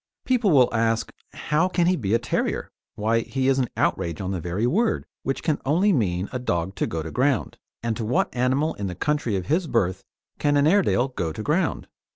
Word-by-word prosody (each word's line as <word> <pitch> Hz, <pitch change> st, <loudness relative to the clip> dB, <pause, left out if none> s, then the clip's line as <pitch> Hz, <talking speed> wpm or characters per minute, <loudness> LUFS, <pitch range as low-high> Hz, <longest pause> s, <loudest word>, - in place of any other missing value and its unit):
People 245 Hz, -5 st, +2 dB
will 130 Hz, -8 st, +5 dB
ask: 115 Hz, 0 st, +1 dB, 0.2 s
"How 155 Hz, +4 st, +1 dB
can 175 Hz, -2 st, +1 dB
he 185 Hz, +1 st, +3 dB
be 110 Hz, -, 0 dB
a -, -, +5 dB
terrier? 120 Hz, -, -2 dB, 0.2 s
Why 110 Hz, +2 st, +1 dB
he 130 Hz, +3 st, -2 dB
is 135 Hz, 0 st, +3 dB
an 125 Hz, -, 0 dB
outrage 85 Hz, -2 st, 0 dB
on 95 Hz, -1 st, -3 dB
the 95 Hz, -, -2 dB
very 90 Hz, +7 st, -2 dB
word, 220 Hz, -, +1 dB, 0.2 s
which 135 Hz, -, -3 dB
can 155 Hz, -3 st, 0 dB
only 180 Hz, +9 st, +3 dB
mean 95 Hz, -, 0 dB
a 125 Hz, -, -3 dB
dog 90 Hz, -6 st, -1 dB
to -, -, 0 dB
go 80 Hz, -1 st, -3 dB
to 80 Hz, -, -6 dB
ground; 130 Hz, -2 st, 0 dB, 0.2 s
and 115 Hz, -1 st, -1 dB
to 115 Hz, -, -3 dB
what 115 Hz, +3 st, 0 dB
animal 130 Hz, +6 st, +1 dB
in 100 Hz, -, -4 dB
the 90 Hz, -, -5 dB
country 145 Hz, -, 0 dB
of 95 Hz, -2 st, -2 dB
his 165 Hz, -, +1 dB
birth 95 Hz, -, 0 dB, 0.4 s
can 145 Hz, 0 st, +2 dB
an 145 Hz, -, +4 dB
Airedale 160 Hz, -7 st, +3 dB
go 85 Hz, -11 st, -3 dB
to 110 Hz, -, -6 dB
ground?" 160 Hz, +6 st, 0 dB
125 Hz, 215 wpm, -24 LUFS, 100-150 Hz, 0.4 s, will